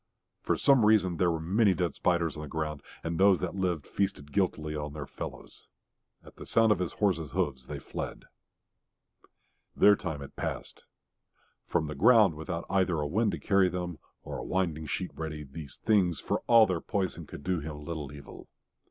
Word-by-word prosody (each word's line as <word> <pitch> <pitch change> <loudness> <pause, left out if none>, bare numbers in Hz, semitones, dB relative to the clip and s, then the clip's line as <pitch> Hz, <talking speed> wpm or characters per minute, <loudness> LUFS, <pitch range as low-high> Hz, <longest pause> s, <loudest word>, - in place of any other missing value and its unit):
For - - 0
some 135 -5 +5
reason 105 -5 +4
there 90 0 +3
were 80 -1 -1
many 95 +4 +3
dead 90 -2 -1
spiders 85 -3 +1
on 75 - -6
the 75 - -6
ground, 75 -2 -3 0.2
and 85 +1 -3
those 95 -1 +6
that - - -3
lived 90 -6 -1
feasted 95 -8 -2
guiltily 80 -5 0
on 75 -1 -4
their 75 -1 -5
fellows. - - -9 0.6
At - - -16
the - - -10
sound 115 -1 +4
of 105 - +3
his 90 -2 -2
horse's 85 -8 0
hoofs 65 -3 -1
they - - -5
fled. - - -6 1.5
Their 105 - +6
time 80 -8 -5
had 70 - -10
passed. - - -5 0.8
From - - 0
the 75 - -4
ground 105 - +6
without 85 +2 -5
either 95 -3 +1
a 75 - -1
wind 105 +8 +1
to - - -4
carry 95 -2 +3
them 90 -2 -4 0.2
or - - -6
a - - -5
winding 85 -5 -1
sheet 90 +5 -3
ready, 80 -1 -5
these 70 0 -10
things, 95 -6 +2
for - - -2
all 115 -2 +8
their 90 -5 -2
poison, 95 -3 -3
could - - -9
do 90 -2 0
him 75 -1 -7
little 75 -4 -5
evil. 70 -1 -11
85 Hz, 185 wpm, -29 LUFS, 75-95 Hz, 1.5 s, all